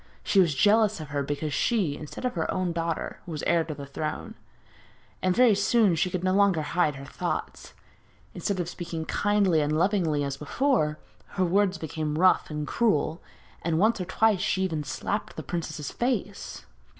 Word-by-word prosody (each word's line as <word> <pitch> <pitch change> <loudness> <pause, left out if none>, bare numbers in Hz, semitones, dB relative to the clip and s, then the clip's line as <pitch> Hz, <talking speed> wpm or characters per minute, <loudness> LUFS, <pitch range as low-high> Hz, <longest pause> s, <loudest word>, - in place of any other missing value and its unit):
She 200 - +3
was 165 -6 +4
jealous 210 +4 +4
of 155 -2 -7
her 145 -1 -1
because 145 +1 -3
she, 190 - +1
instead 150 - -7
of 250 - 0
her 160 -3 -1
own 185 -2 -1
daughter, 165 -1 -3
was 155 -3 -5
heir 170 -1 +3
to 155 -2 -5
the 140 - -7
throne, 150 +2 -5 0.9
and 185 -1 +1
very 245 -3 +6
soon 205 0 +3
she 165 +3 +1
could 180 0 -3
no 185 0 +2
longer 195 -5 +3
hide 150 -1 +1
her 135 +1 -9
thoughts. - - -5 0.6
Instead 185 +2 -2
of 175 - -1
speaking 170 -2 -5
kindly 200 -6 +2
and 150 +1 0
lovingly 170 -5 +1
as 140 -1 -3
before, 155 - +1 0.4
her 185 - +3
words 190 +1 +2
became 155 -1 -3
rough 185 +2 +4
and 150 -1 -3
cruel, 160 -6 +1 0.4
and 165 -1 0
once 215 +3 +3
or - - -2
twice 205 +1 +2
she 190 0 +1
even 160 -5 -1
slapped 205 +8 -3
the - - -6
princess's 155 -4 -4
face. 235 -5 -3
170 Hz, 180 wpm, -27 LUFS, 155-200 Hz, 0.9 s, very